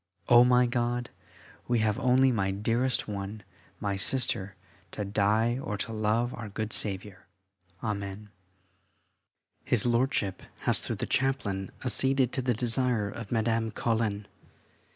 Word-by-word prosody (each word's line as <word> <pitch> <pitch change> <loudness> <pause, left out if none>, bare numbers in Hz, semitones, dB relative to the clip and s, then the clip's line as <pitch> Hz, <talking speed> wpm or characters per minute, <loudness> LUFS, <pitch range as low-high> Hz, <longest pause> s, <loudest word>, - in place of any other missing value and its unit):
Oh, 120 0 +8
my 125 0 +5
God, 120 0 -1 0.6
we 120 - +2
have 110 +1 +1
only, 130 0 +4
my 100 -5 0
dearest 115 +6 0
one, 105 +1 -5 0.4
my 100 -2 -1
Sister, 100 -3 -1 0.3
to 105 - -4
die 110 +4 +2
or 105 -6 -3
to 115 - -4
love 110 +3 +1
our 110 -3 -6
good 110 +2 -4
Saviour. 95 -1 -3 0.6
Amen. 105 -1 -4 1.3
His 120 -3 +2
Lordship 120 -5 +1 0.2
has, - - +1
through - - -2
the - - -3
chaplain, 110 -8 0 0.2
acceded 130 0 +2
to 130 - +1
the 125 -2 +1
desire 120 -2 +1
of 110 -1 -8
Madame 115 0 +1
Colin. 110 -2 -1
115 Hz, 130 wpm, -29 LUFS, 105-125 Hz, 1.3 s, Oh